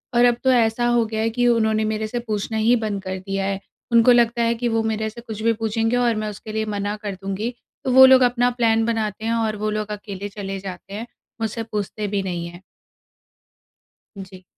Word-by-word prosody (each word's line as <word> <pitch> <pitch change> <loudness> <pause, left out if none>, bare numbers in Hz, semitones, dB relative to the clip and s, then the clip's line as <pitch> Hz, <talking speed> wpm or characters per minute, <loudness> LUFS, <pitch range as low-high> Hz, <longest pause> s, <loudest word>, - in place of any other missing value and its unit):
और 240 +1 +6
अब 240 -1 +4
तो 260 - +4
ऐसा 240 -1 +2
हो 240 -1 +3
गया 220 0 -3
है 225 - +1
कि 245 +2 +1
उन्होंने 220 -2 +2
मेरे 215 0 -2
से 240 +3 -3
पूछना 215 +1 -2
ही 225 +3 +4
बंद 215 -4 -2
कर 190 -1 -4
दिया 195 +1 -3
है। 195 0 -2 0.3
उनको 235 +1 +6
लगता 235 -1 +3
है 230 - +2
कि 240 +1 -2
वो 225 -1 +1
मेरे 220 0 -1
से 235 +2 -11
कुछ 220 -2 -7
भी 230 - +3
पूछेंगे 225 +1 0
और 240 -2 +2
मैं 215 0 -2
उसके 210 +1 -8
लिए 220 0 -1
मना 205 +1 -2
कर 205 -2 -3
दूँगी। 205 +5 -3 0.3
तो 265 - 0
वो 260 +1 +9
लोग 260 0 +7
अपना 245 0 +3
प्लान 225 -1 +3
बनाते 220 -2 -2
हैं 230 - +1
और 225 -2 0
वो 215 +1 -1
लोग 215 0 -3
अकेले 205 -1 -6
चले 195 -1 -5
जाते 190 0 -8
हैं, 225 +3 -5 0.3
मुझसे 225 +1 -2
पूछते 210 -1 -4
भी 200 -1 -1
नहीं 175 -2 -3
हैं। 175 +1 -11 1.6
जी। 185 -1 -10
220 Hz, 220 wpm, -22 LUFS, 205-235 Hz, 1.6 s, वो